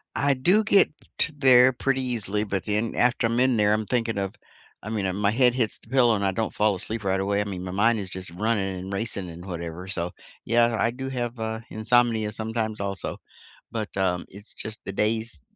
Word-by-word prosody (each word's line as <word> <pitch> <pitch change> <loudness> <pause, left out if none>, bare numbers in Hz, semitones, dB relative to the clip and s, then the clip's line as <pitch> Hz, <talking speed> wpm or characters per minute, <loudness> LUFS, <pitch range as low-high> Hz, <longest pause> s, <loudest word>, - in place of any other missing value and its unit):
I 140 0 +2
do 180 +12 +3
get 205 -2 +4 0.3
to 165 - +6
there 130 -2 +6
pretty 135 +2 0
easily, 110 -5 -1
but 95 -2 -2
then 105 +2 -1
after 125 0 +2
I'm 115 +1 0
in 130 -2 +3
there, 105 0 +3
I'm 110 0 0
thinking 115 -3 -1
of 95 -1 -3 0.5
I 110 - -6
mean, 105 -3 -1
and 95 +1 -2
my 100 0 +2
head 125 +1 +4
hits 115 -5 -1
the - - -16
pillow 120 -1 +4
and 100 - -2
I 95 - +2
don't 110 +4 -2
fall 105 -1 +2
asleep 110 +4 -4
right 95 0 +1
away, 100 +1 0
I - - +1
mean, 95 -3 -5
my 90 - -5
mind 110 +4 +3
is 95 -2 -4
just 95 -1 -6
running 95 0 -1
and 95 +2 -6
racing 100 -3 -3
and 85 +1 -10
whatever, 85 0 -6
so, 90 -2 -1 0.3
yeah, 115 0 +3
I 115 - +2
do 130 +2 -5
have, 120 -2 -4
uh, 110 0 -3
insomnia 110 -1 +2
sometimes 110 0 -3
also, 100 -1 -3 0.5
but, 110 -2 -3
um, 90 -2 0
it's 100 +3 -12
just 110 0 -6
the - - -4
days, 110 -4 0
110 Hz, 220 wpm, -25 LUFS, 100-120 Hz, 0.5 s, to